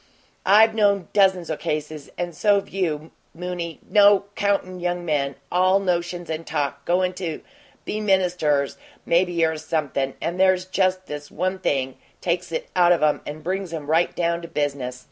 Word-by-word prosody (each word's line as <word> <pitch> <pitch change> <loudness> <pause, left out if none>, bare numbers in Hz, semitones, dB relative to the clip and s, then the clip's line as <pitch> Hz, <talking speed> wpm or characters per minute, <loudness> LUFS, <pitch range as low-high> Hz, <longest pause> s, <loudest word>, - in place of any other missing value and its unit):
I've 220 +3 +6
known 200 -4 +2
dozens 190 -5 +3
o' - - 0
cases, 150 -1 -4
and 175 -1 -3
so've 200 +4 +2
you 160 -5 -2 0.2
moony, 175 -1 -5
no 205 -2 +6
'count 195 -3 -1
young 175 0 -2
men, 140 -4 0 0.2
all 185 +2 +4
notions 175 -2 -2
and 160 0 -4
talk, 140 -3 -3
goin' 180 +1 +1
to 175 -4 -5 0.4
be 215 - -3
ministers, 180 -8 +1 0.3
maybe 170 -1 +2
or 160 0 -1
something; 140 -4 -2
and 175 +2 -3
there's 185 -1 +4
just 185 0 0
this 145 0 -7
one 185 +3 -2
thing 135 -7 -1 0.2
takes 175 0 -2
it 160 - -3
out 175 -1 +5
of 170 - 0
'em 150 -1 +2
and 150 +1 -7
brings 190 +1 -3
'em 150 -3 -6
right 160 +3 +1
down 170 0 0
to 170 - -8
business. 140 -5 -3
175 Hz, 165 wpm, -23 LUFS, 155-185 Hz, 0.4 s, I've